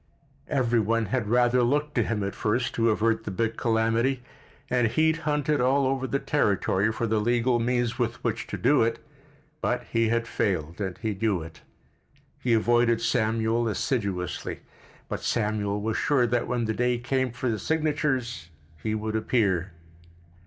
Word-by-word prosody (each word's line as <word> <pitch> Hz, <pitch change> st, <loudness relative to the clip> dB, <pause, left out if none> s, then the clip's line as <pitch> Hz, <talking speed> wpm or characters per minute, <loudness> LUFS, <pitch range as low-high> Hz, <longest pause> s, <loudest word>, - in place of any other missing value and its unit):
Every 120 Hz, -3 st, +1 dB
one 115 Hz, +1 st, +1 dB
had 120 Hz, -5 st, 0 dB
rather 120 Hz, +1 st, +3 dB
looked 145 Hz, +5 st, +1 dB
to 120 Hz, -, +2 dB
him 105 Hz, -1 st, -2 dB
at 100 Hz, -, -3 dB
first 115 Hz, +3 st, -1 dB
to 115 Hz, 0 st, +2 dB
avert 115 Hz, +1 st, +1 dB
the -, -, -5 dB
big 110 Hz, +4 st, -1 dB
calamity, 115 Hz, +3 st, +1 dB, 0.4 s
and 125 Hz, -2 st, +2 dB
he 155 Hz, +8 st, +2 dB
had 160 Hz, -, -4 dB
hunted 150 Hz, -1 st, +1 dB
all 135 Hz, +2 st, +3 dB
over 130 Hz, 0 st, 0 dB
the 140 Hz, -, 0 dB
territory 105 Hz, -7 st, +1 dB
for 115 Hz, -, -2 dB
the 110 Hz, -1 st, +1 dB
legal 120 Hz, +2 st, +2 dB
means 120 Hz, 0 st, 0 dB
with 120 Hz, -1 st, 0 dB
which 115 Hz, -2 st, -2 dB
to 100 Hz, -, -4 dB
do 145 Hz, +10 st, +3 dB
it, 115 Hz, 0 st, +1 dB, 0.6 s
but 125 Hz, -, 0 dB
he 115 Hz, -1 st, +2 dB
had 115 Hz, 0 st, 0 dB
failed, 85 Hz, -4 st, -2 dB
and 95 Hz, -3 st, -3 dB
he 110 Hz, +1 st, -2 dB
knew 100 Hz, -4 st, 0 dB
it. 80 Hz, 0 st, -12 dB, 0.8 s
He 120 Hz, -, +1 dB
avoided 120 Hz, +1 st, +3 dB
Samuel 115 Hz, 0 st, +1 dB
assiduously, 100 Hz, -4 st, -2 dB, 0.5 s
but -, -, -3 dB
Samuel 105 Hz, -2 st, -1 dB
was 110 Hz, +1 st, -2 dB
sure 140 Hz, -5 st, +2 dB
that 120 Hz, 0 st, 0 dB
when 120 Hz, -1 st, -1 dB
the 110 Hz, -, -1 dB
day 125 Hz, +1 st, +1 dB
came 130 Hz, +1 st, -1 dB
for 125 Hz, +2 st, -2 dB
the 110 Hz, -2 st, -1 dB
signatures 135 Hz, -, -1 dB, 0.3 s
he 110 Hz, 0 st, -1 dB
would 110 Hz, 0 st, -3 dB
appear. 100 Hz, -5 st, +1 dB
115 Hz, 170 wpm, -26 LUFS, 110-125 Hz, 0.8 s, rather